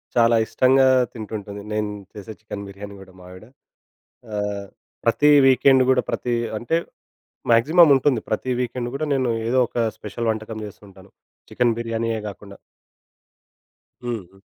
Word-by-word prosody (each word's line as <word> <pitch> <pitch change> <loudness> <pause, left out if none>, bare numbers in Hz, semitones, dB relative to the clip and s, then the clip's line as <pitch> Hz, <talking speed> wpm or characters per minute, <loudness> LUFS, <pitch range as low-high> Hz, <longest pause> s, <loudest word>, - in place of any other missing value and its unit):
చాలా 115 0 +4
ఇష్టంగా 130 +2 +3 0.3
తింటుంటుంది. 105 -2 -7
నేను 105 -1 -1 0.2
చేసే 105 +1 -9
చికెన్ 100 -2 -8
బిర్యానీ 100 +1 -10
గూడా 95 -1 -14
మావిడ. 90 +3 -13 0.9
ఆహ్, 105 -1 -3 0.4
ప్రతి 145 +6 +3 0.2
వీకెండ్ 130 0 +5
గూడా 130 - +3
ప్రతి 120 -1 -2 0.2
అంటే 140 +9 0 0.7
మాక్సిమం 155 +8 +6
ఉంటుంది. 130 -2 +2
ప్రతి 125 +4 -2
వీకెండ్ 120 0 -3
గూడా, 155 +3 -2
నేను 130 -3 0 0.2
ఏదో 130 +2 +2
ఒక - - -10 0.2
స్పెషల్ 115 +2 -4
వంటకం 110 0 -6
జేస్తుంటాను 100 -1 -14 0.4
చికెన్ 120 -2 +1
బిర్యానీయే 115 -1 -2
గాకుండా. 100 0 -10 1.4
హ్మ్. 120 -1 -3 0.2
హ్మ్. 95 - -21
115 Hz, 130 wpm, -22 LUFS, 105-125 Hz, 1.4 s, మాక్సిమం